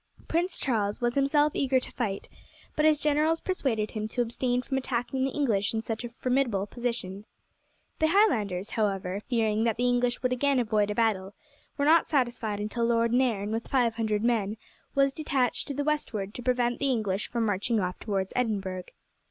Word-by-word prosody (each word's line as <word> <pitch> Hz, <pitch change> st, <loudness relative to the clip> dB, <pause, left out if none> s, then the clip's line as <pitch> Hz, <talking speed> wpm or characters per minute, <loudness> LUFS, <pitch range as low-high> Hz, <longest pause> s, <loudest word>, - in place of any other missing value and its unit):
Prince 345 Hz, +3 st, 0 dB
Charles 210 Hz, -6 st, 0 dB
was 240 Hz, 0 st, 0 dB
himself 290 Hz, +2 st, +2 dB
eager 265 Hz, -1 st, +2 dB
to -, -, -7 dB
fight, 205 Hz, -6 st, -3 dB, 0.5 s
but 305 Hz, -, +2 dB
his 310 Hz, -1 st, +5 dB
generals 305 Hz, +2 st, +2 dB
persuaded 245 Hz, -, -1 dB
him 215 Hz, -1 st, -3 dB
to 245 Hz, +3 st, 0 dB
abstain 245 Hz, +1 st, -1 dB
from 265 Hz, 0 st, -1 dB
attacking 260 Hz, +1 st, -2 dB
the 270 Hz, -, +1 dB
English 225 Hz, -8 st, 0 dB
in 220 Hz, -, 0 dB
such 225 Hz, +1 st, -4 dB
a 240 Hz, -, -5 dB
formidable 245 Hz, -4 st, 0 dB
position. 220 Hz, -4 st, -4 dB, 0.8 s
The 315 Hz, -, +4 dB
Highlanders, 220 Hz, -, +2 dB
however, 195 Hz, -3 st, -1 dB
fearing 220 Hz, -2 st, 0 dB
that 230 Hz, -1 st, +1 dB
the 245 Hz, +1 st, +1 dB
English 245 Hz, 0 st, +1 dB
would 255 Hz, 0 st, +2 dB
again 275 Hz, +1 st, +2 dB
avoid 215 Hz, -3 st, +1 dB
a 210 Hz, -, -2 dB
battle, 205 Hz, -4 st, 0 dB, 0.4 s
were 285 Hz, -, +1 dB
not 325 Hz, +2 st, +5 dB
satisfied 240 Hz, -7 st, 0 dB
until 215 Hz, +3 st, -2 dB
Lord 230 Hz, 0 st, +2 dB
Nairn 230 Hz, -5 st, +1 dB
with 225 Hz, +1 st, -3 dB
five 245 Hz, -4 st, +2 dB
hundred 220 Hz, -2 st, -1 dB
men 220 Hz, -3 st, +1 dB, 0.4 s
was 275 Hz, 0 st, +3 dB
detached 275 Hz, -5 st, 0 dB
to 285 Hz, -, -3 dB
the 285 Hz, -, -1 dB
westward 230 Hz, -10 st, -2 dB
to -, -, -6 dB
prevent 245 Hz, -1 st, +1 dB
the 280 Hz, -, +1 dB
English 210 Hz, -5 st, -1 dB
from 235 Hz, -2 st, 0 dB
marching 210 Hz, +2 st, 0 dB
off 180 Hz, -2 st, -2 dB
towards 195 Hz, -3 st, -2 dB
Edinburgh. 195 Hz, -7 st, -1 dB
235 Hz, 185 wpm, -28 LUFS, 210-265 Hz, 0.8 s, his